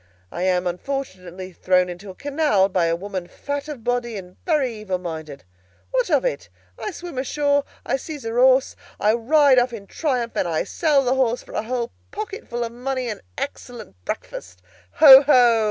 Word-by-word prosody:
I 175 - -5
am, 180 -1 +1
unfortunately, 185 -3 -5
thrown 180 +1 +2
into 180 +3 -8
a 185 - -9
canal 280 -9 +1
by 185 -3 +1
a 165 - +1
woman 185 0 -5
fat 285 +6 -5
of 285 -7 -7
body 245 -2 -1
and 180 -1 -10
very 290 -7 +1
evil 210 -4 -3
minded. 160 -5 -7 0.5
What - - +1
of - - +2
it? - - -2 0.3
I - - -3
swim 345 -7 -7
ashore, 285 +1 +1 0.2
I - - 0
seize 295 +1 -8
her 225 0 -4
horse, 260 +1 +4 0.2
I 210 +1 +3
ride 265 +3 +4
off 245 0 0
in 205 -3 -8
triumph, 250 -1 -2
and - - 0
I 160 -2 0
sell 300 -5 +1
the 250 0 +1
horse 250 -2 0
for - - -15
a - - -1
whole 235 +1 -3 0.2
pocketful 410 - -5
of 230 - -4
money 255 +1 -3
and 210 - -5
an - - -28
excellent 240 - -7
breakfast! 90 0 -7 0.3
Ho, 270 -3 +10
ho! 245 -5 +5
240 Hz, 185 wpm, -22 LUFS, 190-280 Hz, 0.5 s, Ho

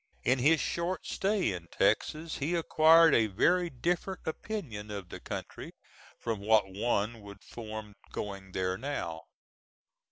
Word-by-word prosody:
In 130 +1 +3
his 150 +5 +4
short 170 +4 -2
stay 195 - 0
in 85 -2 -7
Texas 155 - 0
he 155 +5 0
acquired 165 0 +6
a 110 -1 +4
very 175 - +2
different 175 +7 -2
opinion 155 - -5
of 100 -4 -6
the - - -7
country - - -7 0.4
from 115 -3 -3
what 105 -1 +3
one 110 +1 0
would 100 0 -12
form 110 -2 -8 0.2
going 100 -2 -6
there 95 0 -1
now. 85 - -4
120 Hz, 135 wpm, -30 LUFS, 100-165 Hz, 0.4 s, acquired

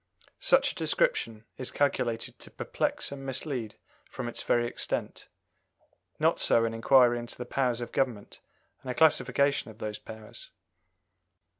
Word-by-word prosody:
Such - - +4
a - - -14
description 115 - 0
is 130 - -3
calculated 120 -5 -1
to - - -8
perplex - - -2
and 140 -1 -7
mislead 130 -4 -3 0.3
from 120 - -5
its 120 - -2
very 120 0 +2
extent; 120 - -3 0.9
not - - +2
so 115 - +4
an 115 - -2
inquiry 120 +1 +5
into 120 0 -6
the 125 - -5
powers 125 -2 0
of 120 - -5
government, 120 -6 -2 0.4
and 130 - -8
a 125 - -2
classification 145 -4 +3
of 110 - -13
those 105 -2 -5
powers. 110 +1 -11
120 Hz, 145 wpm, -29 LUFS, 115-135 Hz, 0.9 s, inquiry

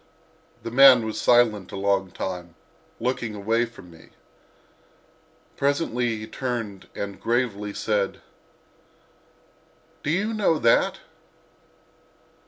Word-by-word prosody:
The 115 - -5
man 130 -2 +7
was 110 - -4
silent 115 -6 +3
a - - -6
long 100 -1 0
time, 90 -2 -6 0.4
looking 120 -3 -2
away 115 +4 +1
from 115 -7 -14
me. 80 - -17 1.5
Presently 125 -5 0
he 110 - -7
turned 115 -6 -5
and 100 -2 -6
gravely 115 -4 -1
said: 100 -1 -1 1.8
"Do - - -3
you 200 +7 0
know 205 -7 +2
that?" 115 -5 +2
115 Hz, 100 wpm, -24 LUFS, 100-125 Hz, 1.8 s, man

